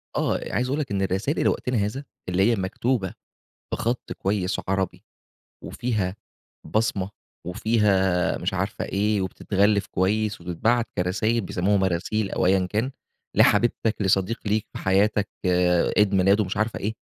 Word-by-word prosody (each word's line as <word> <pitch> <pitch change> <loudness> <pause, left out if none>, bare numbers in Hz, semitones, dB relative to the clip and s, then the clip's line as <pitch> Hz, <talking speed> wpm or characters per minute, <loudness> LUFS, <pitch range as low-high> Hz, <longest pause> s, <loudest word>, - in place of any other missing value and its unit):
آه - - +1
عايز 125 - +1
أقول 140 +4 -1
لك 140 -8 -3
إن 100 -1 0
الرسايل 95 - 0
لوقتنا 125 -1 +1
هذا 105 +7 -1 0.3
اللي 95 +5 +3
هي - - +2
مكتوبة 100 +2 -1 0.6
بخط 120 +2 -2
كويس 95 -1 -1
عربي 95 -1 -1 0.6
وفيها 105 -6 -2 0.5
بصمة 100 0 0 0.4
وفيها 95 -2 +2
مش - - -2
عارف - - -2
إيه 105 +1 0
وبتتغلف 100 +2 +1
كويس 100 +2 0
وبتتبعت 110 +8 +1
كرسايل 110 +6 +1
بيسموها 95 +1 +1
مراسيل، 95 +3 0
أو - - 0
أيًا 95 0 +3
كان، 110 +8 -1 0.4
لحبيبتك، 115 -2 +3
لصديق 95 +3 +1
ليك 105 +1 0
في - - -5
حياتك 100 +2 +2 0.7
عيد 105 -1 +4
ميلاده 100 +3 +4
مش 95 +1 -4
عارف 110 +2 0
ايه، 105 +2 -2
100 Hz, 135 wpm, -24 LUFS, 95-110 Hz, 0.7 s, عيد